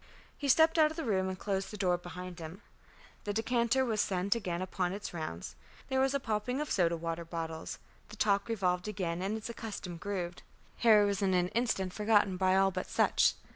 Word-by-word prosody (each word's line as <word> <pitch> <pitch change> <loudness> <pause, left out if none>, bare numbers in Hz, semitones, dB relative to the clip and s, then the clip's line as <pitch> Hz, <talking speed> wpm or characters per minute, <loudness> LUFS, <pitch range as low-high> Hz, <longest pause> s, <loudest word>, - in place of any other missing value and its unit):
He 285 - -4
stepped 320 +4 +5
out 305 -1 +6
of 315 - -9
the 325 - -3
room 190 -4 +1
and 185 - -4
closed 195 0 -2
the 210 - -7
door 180 -3 +2
behind 175 0 -8
him. 165 +5 -8 0.6
The 205 - -2
decanter 235 +3 +2
was 220 -3 +1
sent 190 +1 +1
again 180 -7 -3
upon 185 -1 -2
its 200 -1 -6
rounds; 90 - -5 0.3
there 265 -1 +1
was 270 +1 +2
a - - +2
popping 230 +2 -2
of 300 - -3
soda 170 -3 +2
water 165 +1 -3
bottles; 165 -1 -5 0.3
the 210 - -9
talk 200 0 +1
revolved 180 -4 0
again 180 -4 -2
in 200 +3 -1
its 220 - -6
accustomed 205 -7 -6
groove. 180 -3 -3 0.4
Harry 215 -3 +6
was 200 0 0
in 190 -2 +2
an 180 0 +2
instant 195 -6 0
forgotten 205 -3 +3
by 185 0 +2
all 195 0 +4
but 185 0 -4
Sutch. - - +3
195 Hz, 205 wpm, -32 LUFS, 180-225 Hz, 0.6 s, out